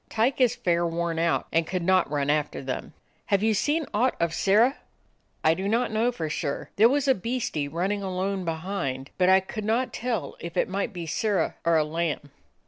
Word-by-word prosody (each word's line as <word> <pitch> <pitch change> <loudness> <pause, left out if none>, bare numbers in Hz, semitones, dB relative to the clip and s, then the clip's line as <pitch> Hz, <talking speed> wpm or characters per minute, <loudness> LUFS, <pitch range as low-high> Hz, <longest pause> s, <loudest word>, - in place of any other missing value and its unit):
Tyke 240 +5 +1
is 250 -3 +4
fair 170 -1 +1
worn 170 -1 -1
out, 170 0 +1
and 165 0 +1
could 185 -1 -2
not 185 -2 +3
run 145 -1 +1
after 150 -2 -1
theml" 130 -1 -4 0.4
"Have 200 0 +2
ye 220 0 +3
seen 295 +9 +1
aught 245 +5 +2
of 170 -1 0
Sirrah?" 220 - +3 0.7
"I 160 - +5
do 190 +4 -3
not 230 +4 +1
know 225 +3 +2
for 165 -10 -4
sure. 150 -2 -3
There 220 +3 +6
was 280 +1 +1
a 265 - +6
beastie 230 - -2
runnin' 185 +7 -1
alone 190 0 -2
behind, 160 -6 -3
but 180 0 +4
I 190 0 +6
could 215 +3 -6
not 230 +4 0
tell 225 - -3
if 170 -1 -7
it - - +2
might 195 +2 -2
be 175 -3 -6
Sirrah 205 +5 0
or 165 -1 +3
a 155 - +3
lamb." 155 -2 -3
185 Hz, 205 wpm, -26 LUFS, 165-220 Hz, 0.7 s, There